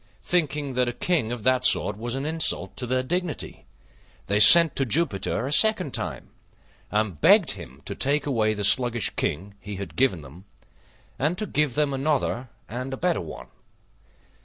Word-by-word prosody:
Thinking 150 -5 -1
that 125 -1 0
a - - -5
King 140 -5 -1
of 120 -3 -6
that 130 0 +2
sort - - +2
was 120 +4 -5
an 135 +1 -4
insult 160 0 -3
to 125 - -5
their 130 +1 0
dignity, 175 +4 -4 0.6
they 100 +2 0
sent 165 +8 +9
to 135 - 0
Jupiter 125 - -1
a 140 - -4
second 185 - +2
time, - - -5 0.6
and 105 -8 -2
begged - - +5
him - - -10
to - - -4
take 145 +2 0
away 110 -6 0
the 105 - -4
sluggish 120 0 +2
King 95 +7 -4
he 105 0 -8
had 100 +1 -8
given 125 -11 +1
them, 75 +7 -14 0.7
and 150 +7 -1
to 215 - -3
give 150 - -1
them 145 -2 0
another 135 -3 -2 0.2
and 125 +3 -6
a - - -14
better 175 +2 -1
one. 80 - -10
130 Hz, 175 wpm, -24 LUFS, 110-150 Hz, 0.7 s, sent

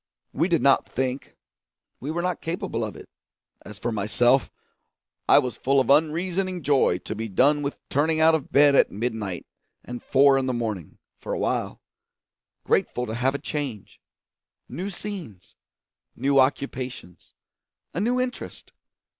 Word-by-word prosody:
We 170 - +1
did 170 -3 +1
not 135 -1 +4
think; 130 +1 -3 0.6
we 135 - -6
were 170 +2 -2
not 180 0 -2
capable 160 -9 -3
of 110 - -5
it. - - -12 0.6
As 105 - -10
for 120 +3 -3
myself, 120 +5 +2 0.8
I - - +8
was 125 -3 +1
full 135 +1 +2
of 130 0 +2
unreasoning 175 +4 +1
joy 135 -10 +3
to 110 - -6
be 110 +1 -4
done 145 +9 +3
with 140 0 -5
turning 155 +3 +1
out 160 +1 +6
of 160 -4 -2
bed 145 +1 +6
at - - +5
midnight 105 -4 -4 0.4
and 120 0 -7
four 135 0 +4
in 130 - -2
the 130 - -1
morning, 110 -9 -4 0.2
for - - -5
a - - -1
while; - - -2 0.8
grateful 125 - 0
to 110 - -5
have 130 +4 0
a - - 0
change, 140 -8 -6 0.7
new 175 +11 -5
scenes, 175 - -8 0.6
new 135 +2 +2
occupations, 130 - -2 0.6
a - - -2
new 245 +5 +1
interest. 250 0 -5
135 Hz, 155 wpm, -25 LUFS, 120-160 Hz, 0.8 s, I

